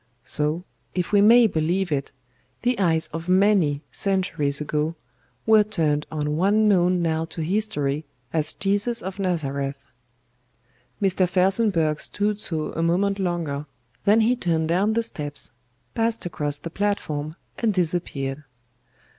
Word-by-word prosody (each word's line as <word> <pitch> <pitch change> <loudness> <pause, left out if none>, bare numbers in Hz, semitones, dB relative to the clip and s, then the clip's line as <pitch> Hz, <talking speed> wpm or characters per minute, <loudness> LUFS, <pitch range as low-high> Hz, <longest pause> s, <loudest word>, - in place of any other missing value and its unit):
So, 150 +5 -1 0.3
if 180 0 -1
we 205 -1 +5
may 235 +3 +7
believe 175 0 0
it, 140 -2 -1 0.5
the 245 -2 +1
eyes 165 -4 +2
of 165 +2 -5
many, 185 -7 +3
centuries 180 -8 0
ago, 150 +2 -1 0.5
were 220 -1 +6
turned 160 -8 0
on 150 -1 -1
one 205 +5 +3
known 180 -3 +3
now 160 -1 0
to 165 0 -6
history 155 -6 -1 0.3
as 155 -1 0
JESUS 205 +4 0
OF 190 +2 -6
NAZARETH. 140 -7 -1 1.2
"Mr. 185 -2 +2
FELSENBURGH 180 -5 +2
stood 205 0 -1
so 160 -6 -2
a 165 - -2
moment 195 +4 +1
longer, 165 -6 -2 0.4
then 215 +3 +5
he 235 +3 +3
turned 165 -8 0
down 195 +6 +2
the 230 +1 +1
steps, 145 - -4 0.4
passed 230 -2 0
across 145 -4 -2
the 165 - -7
platform 160 -7 -2 0.2
and 230 -2 +2
disappeared. 155 -6 -2
175 Hz, 135 wpm, -24 LUFS, 155-200 Hz, 1.2 s, may